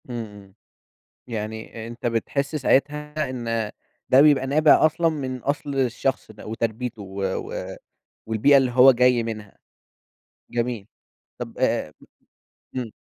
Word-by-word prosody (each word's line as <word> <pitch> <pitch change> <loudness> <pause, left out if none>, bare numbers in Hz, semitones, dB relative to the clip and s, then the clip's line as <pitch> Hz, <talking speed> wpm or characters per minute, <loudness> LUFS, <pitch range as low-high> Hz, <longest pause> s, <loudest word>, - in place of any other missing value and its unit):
إمم 120 -2 -4
إمم. 100 -2 -14 0.7
يعني 110 0 -6
أنت 120 +1 -9
بتحس 140 +5 -1
ساعتها 150 +1 0
إن 115 -4 -2 0.4
ده 130 - +7
بيبقى 145 -3 +5
نابع 150 +2 +5
أصلًا 165 +2 +2
من 135 -5 -4
أصل 140 +2 -3
الشخص 130 -2 -1
ده، 110 - -13
وتربيته 115 +1 -3
و 100 0 -7
و 95 -1 -4 0.5
والبيئة 110 +6 +4
اللي 130 -2 +2
هو 130 +2 +8
جاي 125 -1 +3
منها؟ 110 -3 -7 0.9
جميل. 120 -3 -2 0.5
طب - - -7
أ - - 0 0.8
امم. 120 -4 -4
125 Hz, 125 wpm, -24 LUFS, 110-140 Hz, 0.9 s, هو